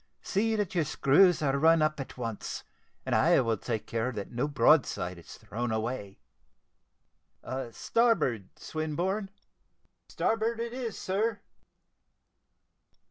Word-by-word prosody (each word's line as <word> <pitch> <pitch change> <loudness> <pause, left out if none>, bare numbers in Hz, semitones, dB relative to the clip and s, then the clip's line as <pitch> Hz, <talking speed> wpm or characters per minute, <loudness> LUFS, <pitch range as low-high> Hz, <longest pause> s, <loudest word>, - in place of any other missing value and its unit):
See 220 +3 +1
that 205 -4 -1
your 170 -3 +2
screws 155 +4 +4
are 140 -1 +1
run 160 +1 +5
up 155 -1 0
at 135 - -7
once, 115 -4 -5 0.4
and - - -1
I - - +5
will 115 -3 0
take 110 +1 -3
care 115 +2 -1
that 100 -2 -6
no 125 +4 -1
broadside 110 - +2
is 85 - -12
thrown 120 +2 -4
away. 110 -2 -3 1.5
Starboard, 150 - +1
Swinburne." 175 +6 -2 0.8
"Starboard 225 +1 0
it 235 0 -3
is, 245 -4 -4
sir." 205 +2 -1
150 Hz, 120 wpm, -29 LUFS, -, 1.5 s, run